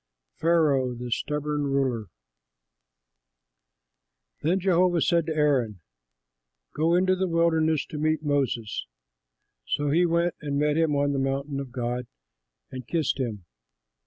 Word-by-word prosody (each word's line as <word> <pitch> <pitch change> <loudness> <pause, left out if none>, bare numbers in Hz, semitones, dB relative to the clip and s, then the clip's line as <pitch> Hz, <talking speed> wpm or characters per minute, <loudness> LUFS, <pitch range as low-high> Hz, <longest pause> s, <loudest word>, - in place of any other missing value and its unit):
PHARAOH 150 -7 +2
THE 120 0 -6
STUBBORN 150 +3 -1
RULER 130 -6 0 2.3
Then 175 +5 +1
Jehovah 180 -1 +3
said 170 -2 +2
to 160 - -2
Aaron, 130 - +1 0.9
"Go 165 +3 +2
into 185 +1 +3
the 190 0 -1
wilderness 160 -2 +2
to 150 - -4
meet 155 +1 0
Moses." 135 - -1 0.8
So 145 -1 0
he 175 +3 +3
went 170 +1 +1
and 145 -2 -2
met 150 0 +2
him 160 -2 +2
on 145 0 +1
the 135 - 0
mountain 135 +1 -2
of 135 -3 -6
God 125 0 -3 0.6
and 130 -3 -8
kissed 155 -5 0
him. 110 -8 -3
150 Hz, 130 wpm, -26 LUFS, 130-165 Hz, 2.3 s, Jehovah